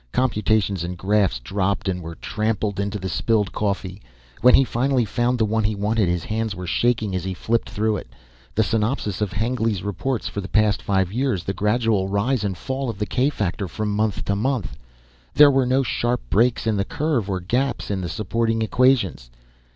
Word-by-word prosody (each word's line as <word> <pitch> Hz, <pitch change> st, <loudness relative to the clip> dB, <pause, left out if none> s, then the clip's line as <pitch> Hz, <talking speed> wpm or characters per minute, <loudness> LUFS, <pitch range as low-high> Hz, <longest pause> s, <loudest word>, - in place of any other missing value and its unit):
Computations 105 Hz, -6 st, +1 dB
and 90 Hz, +1 st, -5 dB
graphs 95 Hz, -5 st, +2 dB
dropped 95 Hz, +11 st, -2 dB
and 90 Hz, -1 st, -1 dB
were 85 Hz, 0 st, -7 dB
trampled 105 Hz, -1 st, -2 dB
into 100 Hz, +1 st, -2 dB
the 95 Hz, -1 st, -5 dB
spilled 105 Hz, +1 st, +1 dB
coffee. 100 Hz, -1 st, -3 dB, 0.4 s
When 125 Hz, +1 st, +7 dB
he 135 Hz, -, +6 dB
finally 130 Hz, 0 st, +1 dB
found 120 Hz, +3 st, 0 dB
the 110 Hz, -, +2 dB
one 110 Hz, +1 st, 0 dB
he 105 Hz, +1 st, 0 dB
wanted 105 Hz, -1 st, +1 dB
his 90 Hz, -1 st, -1 dB
hands 110 Hz, -1 st, -2 dB
were 90 Hz, -1 st, -6 dB
shaking 110 Hz, +3 st, +1 dB
as 90 Hz, -, -2 dB
he 95 Hz, 0 st, -3 dB
flipped 115 Hz, +5 st, -1 dB
through 110 Hz, 0 st, 0 dB
it. -, -, -8 dB, 0.5 s
The 110 Hz, -, +3 dB
synopsis 105 Hz, -2 st, -1 dB
of 105 Hz, -2 st, 0 dB
Hengly's 110 Hz, -3 st, -1 dB
reports 105 Hz, +5 st, -2 dB
for 100 Hz, -, -4 dB
the 95 Hz, -, -6 dB
past 110 Hz, -1 st, +2 dB
five 95 Hz, -2 st, 0 dB
years. 125 Hz, -7 st, 0 dB
The 95 Hz, -, -2 dB
gradual 105 Hz, -1 st, +1 dB
rise 105 Hz, +4 st, 0 dB
and 95 Hz, -3 st, -2 dB
fall 135 Hz, -1 st, -3 dB
of 115 Hz, -, -5 dB
the 105 Hz, -, -1 dB
k 130 Hz, +6 st, +1 dB
factor 100 Hz, -6 st, -2 dB
from 105 Hz, +5 st, -3 dB
month 105 Hz, -1 st, -1 dB
to 100 Hz, -, 0 dB
month. 125 Hz, +1 st, -1 dB, 0.6 s
There 145 Hz, -1 st, +8 dB
were 135 Hz, -2 st, +2 dB
no 130 Hz, +2 st, +2 dB
sharp 120 Hz, -1 st, -1 dB
breaks 120 Hz, +3 st, +2 dB
in 110 Hz, -2 st, +1 dB
the 100 Hz, -, +1 dB
curve 135 Hz, -3 st, -1 dB
or 95 Hz, -1 st, -1 dB
gaps 120 Hz, +7 st, -1 dB
in 95 Hz, -2 st, -1 dB
the 90 Hz, -, -4 dB
supporting 115 Hz, +4 st, -1 dB
equations. 110 Hz, -, +2 dB
105 Hz, 195 wpm, -22 LUFS, 95-120 Hz, 0.6 s, There